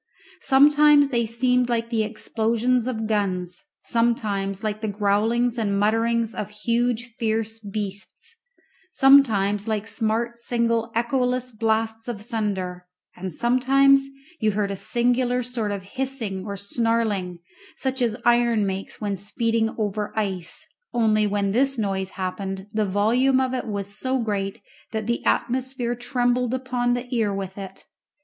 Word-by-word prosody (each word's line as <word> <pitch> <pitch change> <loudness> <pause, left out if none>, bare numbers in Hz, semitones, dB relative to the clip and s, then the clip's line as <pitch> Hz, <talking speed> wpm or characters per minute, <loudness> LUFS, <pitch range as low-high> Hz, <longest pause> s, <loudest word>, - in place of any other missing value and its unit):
Sometimes 290 +1 +6
they 235 -4 0
seemed 250 +2 +1
like 230 0 -1
the 225 -2 +2
explosions 230 +3 0
of 225 -3 -2
guns, 185 -2 -1 0.2
sometimes 210 -5 0
like 215 0 -2
the 220 - -2
growlings 220 +4 +1
and 200 -3 0
mutterings 225 +2 +1
of 210 - -4
huge 235 +2 -1
fierce 225 0 -1
beasts, 205 - -6 0.6
sometimes 220 - +4
like 215 -1 -1
smart 225 +1 -1
single 235 -1 0
echoless 250 +1 0
blasts 220 0 -1
of 235 -4 -4
thunder; 190 -5 -3 0.3
and 185 +1 -5
sometimes 270 - +4 0.3
you 215 -2 +1
heard 200 -1 0
a - - -2
singular 245 +3 +1
sort 235 -3 -2
of 200 -2 -4
hissing 220 -4 -3
or 200 -1 -4
snarling, 205 -3 -1 0.4
such 265 -1 -2
as 230 -3 +1
iron 235 -3 +3
makes 195 0 -4
when 205 -2 -2
speeding 225 +3 0
over 210 -1 -2
ice, 190 -5 -2 0.3
only 215 -3 +3
when 200 -1 0
this 270 +4 +2
noise 195 -3 -1
happened 190 +1 -4
the 215 -1 +1
volume 240 +7 +3
of 260 -1 0
it 255 - -3
was 200 -1 -4
so 260 0 0
great 200 -4 -2 0.3
that 220 -1 -2
the 235 +1 -1
atmosphere 255 -1 0
trembled 245 0 0
upon 250 -1 0
the 245 +1 -4
ear 220 -3 +1
with 195 -1 -4
it. 195 -1 -8
225 Hz, 140 wpm, -24 LUFS, 205-245 Hz, 0.6 s, Sometimes